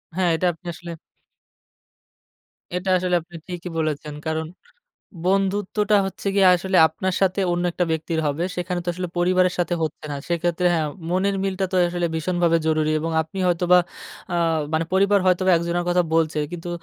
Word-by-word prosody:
হ্যাঁ 185 Hz, -2 st, +2 dB
এটা 180 Hz, -, -1 dB
আপনি 165 Hz, -, -25 dB
আসলে 170 Hz, 0 st, -9 dB, 1.8 s
এটা 180 Hz, +1 st, -2 dB
আসলে 180 Hz, 0 st, 0 dB
আপনি 170 Hz, +1 st, -16 dB
ঠিকই 180 Hz, -1 st, -6 dB
বলেছেন। 155 Hz, -1 st, -2 dB
কারণ 160 Hz, 0 st, -2 dB, 0.8 s
বন্ধুত্বটা 200 Hz, +2 st, +1 dB
হচ্ছে 195 Hz, +1 st, -5 dB
গিয়ে 195 Hz, -2 st, +5 dB
আসলে 190 Hz, +1 st, 0 dB
আপনার 190 Hz, +2 st, -3 dB
সাথে 190 Hz, +1 st, +2 dB
অন্য 175 Hz, 0 st, 0 dB
একটা 175 Hz, 0 st, 0 dB
ব্যক্তির 160 Hz, +1 st, -1 dB
হবে 145 Hz, +4 st, -1 dB
সেখানে 180 Hz, 0 st, -2 dB
তো -, -, -1 dB
আসলে 180 Hz, 0 st, -4 dB
পরিবারের 180 Hz, +1 st, +3 dB
সাথে 175 Hz, 0 st, 0 dB
হচ্ছে 155 Hz, 0 st, -4 dB
না। 145 Hz, -, -3 dB
সেক্ষেত্রে 175 Hz, +1 st, 0 dB
হ্যাঁ 155 Hz, -2 st, 0 dB, 0.2 s
মনের 195 Hz, +2 st, +1 dB
মিলটা 190 Hz, 0 st, -1 dB
তো -, -, -1 dB
আসলে 175 Hz, -1 st, -1 dB
ভীষণভাবে 170 Hz, 0 st, +1 dB
জরুরি 155 Hz, -1 st, +1 dB
এবং 165 Hz, +2 st, -3 dB
আপনি 160 Hz, +5 st, -7 dB
হয়তোবা 180 Hz, +1 st, +4 dB, 0.5 s
আ -, -, +1 dB, 0.4 s
মানে 160 Hz, +1 st, +1 dB
পরিবার 200 Hz, +1 st, +4 dB
হয়তোবা 185 Hz, 0 st, +3 dB
একজনের 170 Hz, +1 st, -2 dB
কথা 180 Hz, 0 st, +3 dB
বলছে 160 Hz, -1 st, +1 dB
কিন্তু 175 Hz, 0 st, -6 dB
175 Hz, 165 wpm, -22 LUFS, 165-185 Hz, 1.8 s, গিয়ে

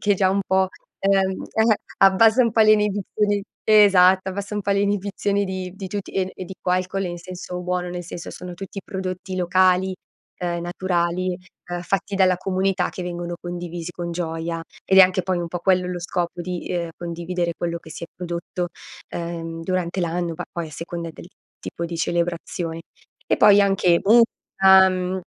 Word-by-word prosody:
che 205 Hz, -1 st, +3 dB
già 190 Hz, 0 st, +2 dB
un 195 Hz, +1 st, +1 dB
po', 190 Hz, 0 st, +2 dB, 0.3 s
ehm 195 Hz, -1 st, +2 dB
eh, 220 Hz, -1 st, +2 dB, 0.2 s
abbassa 220 Hz, +5 st, +6 dB
un 230 Hz, -, +2 dB
po' 225 Hz, -, +3 dB
le 215 Hz, 0 st, +7 dB
inibizioni 205 Hz, 0 st, +1 dB, 0.2 s
Esatto, 190 Hz, -3 st, +6 dB
abbassa 200 Hz, +2 st, -5 dB
un 205 Hz, -, -2 dB
po' 200 Hz, -, -1 dB
le 200 Hz, -, +2 dB
inibizioni 200 Hz, 0 st, 0 dB
di 185 Hz, -1 st, -4 dB
di 195 Hz, -1 st, -6 dB
tutti. 200 Hz, 0 st, -5 dB
E 190 Hz, -1 st, -1 dB
e 185 Hz, -, -6 dB
dico 185 Hz, 0 st, -5 dB
alcol 185 Hz, +2 st, 0 dB
in 175 Hz, 0 st, -5 dB
senso 180 Hz, 0 st, -7 dB
buono, 180 Hz, 0 st, -2 dB
nel 175 Hz, 0 st, -5 dB
senso 170 Hz, 0 st, -7 dB
sono 180 Hz, -1 st, -8 dB
tutti 195 Hz, +2 st, -7 dB
prodotti 190 Hz, -1 st, -5 dB
locali, 185 Hz, +1 st, +3 dB, 0.5 s
uhm, 175 Hz, -1 st, -2 dB
naturali, 175 Hz, 0 st, -1 dB, 0.3 s
uhm, 175 Hz, 0 st, -2 dB
fatti 195 Hz, +2 st, -2 dB
dalla 185 Hz, -1 st, +4 dB
comunità, 190 Hz, +1 st, 0 dB
che 185 Hz, -, -6 dB
vengono 175 Hz, 0 st, -4 dB
condivisi 175 Hz, -1 st, -5 dB
con 175 Hz, -1 st, -5 dB
gioia. 165 Hz, -1 st, -3 dB, 0.2 s
Ed 190 Hz, -, +4 dB
è -, -, +12 dB
anche 185 Hz, 0 st, +3 dB
poi 185 Hz, -1 st, -1 dB
un 175 Hz, -, -2 dB
po' 175 Hz, +1 st, -4 dB
quello 185 Hz, 0 st, +2 dB
lo 180 Hz, -1 st, -4 dB
scopo 175 Hz, 0 st, -3 dB
di, 180 Hz, 0 st, -5 dB
ehm, 170 Hz, -1 st, -2 dB
condividere 170 Hz, 0 st, -3 dB
quello 170 Hz, 0 st, -2 dB
che 160 Hz, -, -14 dB
si 155 Hz, -, -9 dB
è -, -, -10 dB
prodotto, 175 Hz, 0 st, -4 dB, 0.4 s
ehm, 165 Hz, -1 st, -5 dB
durante 185 Hz, +1 st, -1 dB
l'anno, 170 Hz, 0 st, -1 dB
bah, -, -, -5 dB
poi 170 Hz, -1 st, -3 dB
a -, -, -13 dB
seconda 170 Hz, +2 st, -6 dB
del 170 Hz, -, -12 dB, 0.3 s
tipo 170 Hz, -, -5 dB
di 170 Hz, 0 st, -5 dB
celebrazione. 170 Hz, 0 st, -2 dB, 0.5 s
E -, -, +2 dB
poi 205 Hz, 0 st, +7 dB
anche, 195 Hz, -3 st, +3 dB
musica. 190 Hz, -4 st, +4 dB
185 Hz, 180 wpm, -23 LUFS, 175-195 Hz, 0.5 s, è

